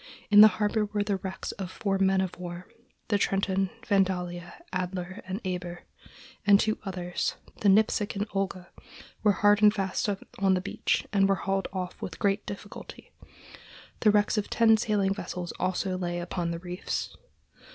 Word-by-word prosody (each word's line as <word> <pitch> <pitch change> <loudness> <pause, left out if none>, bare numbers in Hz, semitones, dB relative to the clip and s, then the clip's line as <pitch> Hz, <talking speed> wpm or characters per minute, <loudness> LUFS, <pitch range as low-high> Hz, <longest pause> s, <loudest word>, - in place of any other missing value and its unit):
In 205 0 +10
the 215 - +12
harbor 210 0 +1
were 205 0 -1
the 205 -1 -1
wrecks 190 0 -5
of 185 - -4
four 195 0 -1
men 190 0 +3
of 185 -2 -3
war: 175 0 -7 0.4
the 205 -2 +2
Trenton, 195 -1 +1 0.2
Vandalia, 180 -4 0 0.2
Adler, 185 0 -3
and 190 +2 -3
Eber; 180 -1 -4 0.6
and 200 -1 +6
two 215 0 0
others, 180 -2 -3 0.2
the 205 - +3
Nipsic 210 +1 +3
and 200 +1 -1
Olga, 190 -2 -3 0.5
were 210 -2 +4
hard 205 +1 +4
and 210 -1 +8
fast 195 0 -1 0.3
on 190 -1 +4
the - - +1
beach 185 - -1
and 195 -1 +4
were 195 - +4
hauled 195 0 0
off 185 -1 -5
with - - -6
great 200 0 0
difficulty. 205 +1 -9 0.9
The 215 - +4
wrecks 210 +1 +3
of 205 - -4
ten 225 -1 +5
sailing 205 -3 +1
vessels 180 -3 -5
also 185 +1 -1
lay 175 -1 -2
upon 175 0 -3
the 170 - -3
reefs. 180 +2 -4
195 Hz, 165 wpm, -28 LUFS, 180-205 Hz, 0.9 s, the